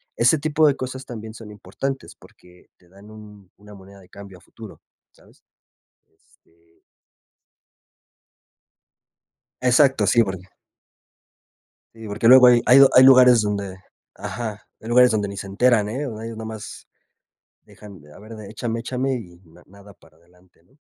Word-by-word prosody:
ese 125 +7 +2
tipo 155 +1 +1
de 140 - +1
cosas 130 +1 -7
también 110 -3 -10
son 115 -2 -13
importantes 135 +6 -7
porque 90 0 -22
te 90 - -28
dan 100 +3 -18
un 105 -3 -16
una 105 0 -17
moneda 100 +1 -17
de 95 - -20
cambio 100 -1 -14
a - - -23
futuro, 110 +2 -15 0.3
¿sabes? - - -26 0.7
Este 85 0 -35 2.8
Exacto, 130 -3 +2
sí, 120 +4 +3
porque 95 -3 -7 1.5
Sí, 115 -1 -12
porque 110 +2 -1
luego 130 0 +8
hay 120 -1 +5
hay 125 - +6
do 135 -1 +7
hay 130 - +7
lugares 125 -3 +6
donde 100 -2 -5 0.4
ajá. 110 -2 -7 0.2
Hay 110 - -11
lugares 125 +1 +4
donde 105 -3 -2
ni 100 - -9
se 100 - -8
enteran, 110 +1 +1
¿eh? 135 +7 -5
O 110 -5 -8
ahi 115 +1 -8
nomás, 110 -1 -10 0.8
dejan 100 -4 -16
de: 75 0 -19
"a - - -16
ver, 110 +2 -13
de 110 -2 -12
échame 115 +1 -5
échame", 130 +3 -3
y 90 -8 -10
na 85 +1 -21
nada 100 +1 -18
para 80 -5 -25
adelante, 90 +1 -29
¿no? 130 - -32
110 Hz, 160 wpm, -21 LUFS, 100-125 Hz, 2.8 s, luego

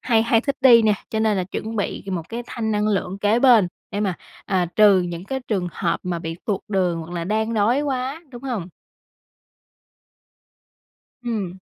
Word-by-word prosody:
hay 230 -3 +2
hay 230 0 +3
thích 280 +2 -2
đi 240 -4 +7
nè, 215 -1 +4 0.2
cho 220 - -1
nên 215 -2 +2
là 185 - 0
chuẩn 220 +4 -5
bị 205 - -3
một 170 -3 -4
cái 235 +1 -5
thanh 220 -2 -3
năng 210 0 +1
lượng 195 -2 -1
kế 210 +3 +2
bên 240 -8 +6 0.2
để 205 - -3
mà, 195 -4 0 0.3
à, 185 -3 +1
trừ 205 -3 +6
những 175 0 -5
cái 265 +5 -3
trường 190 -5 0
hợp 170 - -1
mà 180 -2 -2
bị 165 -1 -5
tuột 200 -3 -1
đường 180 -4 0
hoặc 165 +1 -9
là 170 -1 -3
đang 220 +3 -1
đói 225 +6 +2
quá, 275 +3 -3
đúng 240 -1 -10
hông? 235 -10 -3 2.5
Ừm. 215 -7 -3
210 Hz, 190 wpm, -22 LUFS, 185-235 Hz, 2.5 s, đi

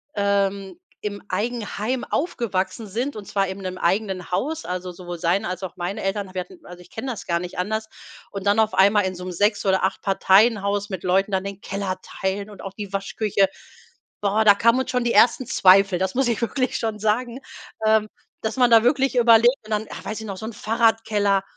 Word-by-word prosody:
ähm, 200 -2 0 0.2
im 205 -1 -5
Eigenheim 230 +3 -2
aufgewachsen 225 - -2
sind 240 +8 -3
und 210 - -8
zwar 195 -1 0
eben 190 +1 -6
in - - -9
'nem - - -11
eigenen 185 -1 -1
Haus, 310 - -2
also 180 0 -4
sowohl 175 0 -8
seine 180 +5 +1
als 185 +1 -5
auch 185 - -6
meine 180 +3 -4
Eltern, 195 -1 -3
wir 185 - -2
hatten 180 - -13
also 180 0 -11
ich - - -17
kenne 250 +4 -6
das 225 - -7
gar 170 -1 0
nicht 180 0 -7
anders, 220 +4 -2 0.4
und 200 -1 -6
dann 205 +2 +3
auf 220 -3 +2
einmal 200 +1 +4
in 185 -1 -3
so 180 - -8
'nem 185 - -5
6- 205 +4 +1
oder 190 -1 +2
8- 190 - 0
Parteien-Haus 200 +1 +3
mit 190 -4 -5
Leuten 195 +2 +1
dann 190 0 0
den 200 0 -7
Keller 195 -1 -3
teilen 200 +2 -4
und 205 - -12
auch 195 0 -7
die 200 -1 -7
Waschküche. 195 0 0 0.7
Boah, 205 +2 +2
da 205 -1 +8
kamen 230 +4 +3
uns - - -4
schon 250 -1 0
die 235 - +1
ersten 250 +1 +4
Zweifel, 190 -1 +5
das 190 +4 -1
muss 265 -1 +2
ich 235 - -1
wirklich 255 +2 -1
schon 220 -2 -3
sagen, 235 +4 -1 0.5
ähm, 215 -1 +3 0.3
dass 220 +3 -3
man 245 -2 +4
da 225 0 +7
wirklich 265 +1 +2
überlegt 235 +1 +6
und 215 - -11
dann 215 0 -1
ach, - - -8
weiß 215 +1 -4
ich - - -7
noch, 195 - -5
so 220 - -7
'n 235 - -6
Fahrradkeller 215 -3 +1
205 Hz, 215 wpm, -23 LUFS, 190-225 Hz, 0.7 s, da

